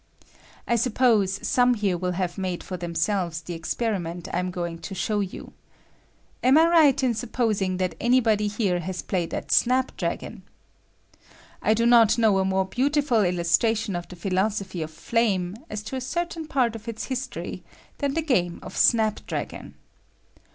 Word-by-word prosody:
I 235 - +2
suppose 215 -5 +2
some 245 0 +3
here 205 -4 0
will 180 +1 -2
have 180 -1 -2
made 185 -3 -3
for 185 - -6
themselves 175 0 -1
the 170 +2 -7
experiment 175 0 -3
I 175 - +1
am 180 0 -2
going 170 -2 -4
to 195 - -7
show 210 +3 -1
you. 195 -2 -5 0.9
Am 260 +4 +6
I 320 - +7
right 315 -6 +4
in 250 -2 +2
supposing 215 -5 -1
that 185 -1 -1
any 245 +2 +4
body 215 -3 +1
here 200 -4 0
has 180 +1 -5
played 175 -3 -2
at - - -5
snapdragon? 255 +2 0 1.2
I 220 - +3
do 230 +1 +1
not 235 -2 +6
know 215 -4 +3
a 190 - +1
more 190 0 +1
beautiful 275 +2 +1
illustration 190 +4 +1
of 175 0 -5
the 180 - -10
phi 175 +3 -5
losophy 190 -2 -1
of 155 - -6
flame, 190 0 0
as 210 0 -5
to 220 +5 -6
a 260 - -3
certain 330 +4 -3
part 250 -6 +1
of 225 +1 -10
its 225 -1 -4
history, 260 -1 -5 0.4
than 280 -1 -1
the 325 - 0
game 180 - +1
of 185 - -9
snapdragon. 220 -3 0
210 Hz, 165 wpm, -25 LUFS, 180-245 Hz, 1.2 s, I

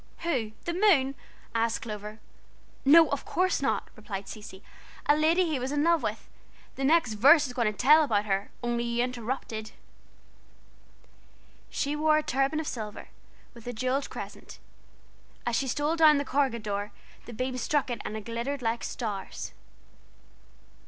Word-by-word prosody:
"Who, 255 -11 -1
the 340 - -1
moon?" 340 -9 +4 0.4
asked 230 0 0
Clover. 210 -1 -6 0.7
"No, 315 +3 +7
of 285 - -1
course 370 -1 0
not," 275 - 0
replied 200 -2 -6
Cecy, 205 -2 -10 0.4
"a 290 - +5
lady 325 +4 +3
he 310 -5 -1
was 255 +2 -3
in 295 0 +1
love 335 0 +3
with. - - -4 0.5
The 270 - -4
next 280 -5 +3
verse 285 +8 +6
is 250 - -6
going 235 -4 +1
to 210 - -15
tell 305 +5 +6
about 210 -7 +1
her, 195 -1 -1
only 240 0 0
you 235 0 0
interrupted. 235 -3 -4 2.0
"She 285 +1 -1
wore 305 0 +3
a 310 - 0
turban 275 +4 0
of 315 - -3
silver, 215 -3 -6 0.4
with 235 -1 -13
a 245 - -3
jewelled 255 +4 -1
crescent. - - -9 0.9
As 240 - 0
she 270 - 0
stole 290 +5 0
down 310 -2 +7
the 285 - -1
corregidor 225 -7 -1 0.4
the 240 - -8
beams 255 +2 -3
struck 290 -1 0
it 235 - -3
and 215 - -4
it 215 - -8
glittered 240 +4 -3
like 230 +1 -1
stars. 205 -5 -5
255 Hz, 160 wpm, -28 LUFS, 225-295 Hz, 2.0 s, No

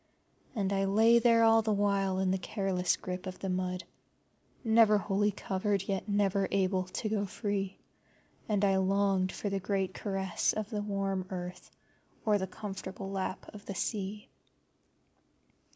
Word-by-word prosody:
And 200 -2 0
I 195 0 +1
lay 225 +4 +5
there 230 -1 +5
all 225 0 +6
the 220 0 0
while 200 -2 +1
in 190 -1 +1
the 190 - 0
careless 185 -2 0
grip 180 +1 -6
of 185 - -6
the 195 - -4
mud, 180 0 -2 0.8
never 220 -2 +5
wholly 205 +1 +1
covered, 200 0 -1
yet 195 +1 -3
never 200 -1 +2
able 185 -1 +1
to 185 +4 -4
go 205 -2 0
free, 195 -1 -3 0.7
and 205 -1 +2
I 195 -1 +3
longed 190 -1 +2
for 205 - -4
the 195 - 0
great 195 0 -1
caress 195 -3 -1
of 215 -1 -4
the 210 -2 -1
warm 195 -2 -2
Earth 180 -1 -6 0.6
or 210 -2 +3
the 190 - -2
comfortable 195 -1 -6
lap 190 0 -3
of 210 -1 -12
the 195 - -4
Sea. 205 +1 -3
195 Hz, 155 wpm, -31 LUFS, 190-205 Hz, 0.8 s, all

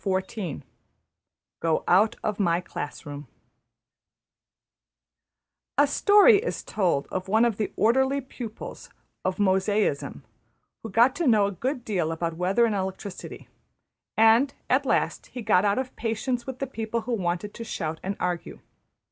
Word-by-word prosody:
\chapter{Go 190 -4 -5
Out 205 +5 +4
of 210 -1 -2
My 170 -3 +2
Class 145 -4 -7
Room} 145 -1 -8 2.5
A 285 - +6
story 410 - +6
is 470 - -4
told 175 -9 0
of 185 0 -3
one 220 +4 +4
of 230 -4 0
the 215 - -2
orderly 265 +5 +3
pupils 245 -4 -8 0.3
of 185 0 -1
Mosaism 195 -4 +1 0.6
who 225 - -7
got 235 +6 +4
to 340 - 0
know 215 -4 +5
a 200 - -1
good 250 - -3
deal 175 -7 -1
about 165 0 -3
weather 190 +7 +2
and 225 - 0
electricity; 190 0 -5 0.7
and 225 +5 +5 0.2
at - - +3
last - - 0
he 245 - -7
got 210 -2 +3
out 200 0 +2
of 260 -1 -3
patience 240 +2 -2
with 260 -1 -5
the 275 - -2
people 225 -1 -3
who 240 +2 -3
wanted 185 0 -2
to 230 - -7
shout 160 -8 -4
and 195 +1 -4
argue. 180 -1 -3
210 Hz, 145 wpm, -26 LUFS, 185-240 Hz, 2.5 s, A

